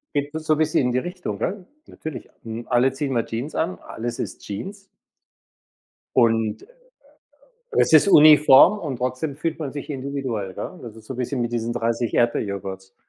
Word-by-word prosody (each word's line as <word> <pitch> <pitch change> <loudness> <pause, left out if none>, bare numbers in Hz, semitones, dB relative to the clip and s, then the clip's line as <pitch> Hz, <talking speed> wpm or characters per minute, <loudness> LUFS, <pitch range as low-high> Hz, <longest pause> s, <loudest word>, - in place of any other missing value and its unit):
Geht 145 +1 -1
es 160 0 -5
so 155 - +3
bisschen 155 0 +1
in 125 -2 +1
die 125 - +2
Richtung, 180 +4 -5
ne? 190 -2 -3 0.2
Natürlich, 155 -4 -8
hm, 115 +1 -7
alle 125 +2 +3
ziehen 140 0 -3
mal 120 -3 0
Jeans 120 +7 -5
an, 175 +3 -2
alles 120 +1 -6
ist - - -5
Jeans 195 - -7 1.3
und 115 -3 +2 1.1
es 435 - +2
ist 160 +5 +7
uniform 150 +3 +7
und 150 -9 -4
trotzdem 130 +4 -3
fühlt 160 +1 -3
man 150 -4 -4
sich 145 +2 -7
individuell, 130 -8 -4
ja? 185 - -6
Das 115 -3 -9
ist 110 - -14
so 120 - -7
'n 125 - -9
bisschen 125 0 -2
mit 120 0 -3
diesen 120 0 -2
30 115 0 -1
Erdbeerjoghurts. 100 -4 -1
130 Hz, 175 wpm, -23 LUFS, 115-155 Hz, 1.3 s, ist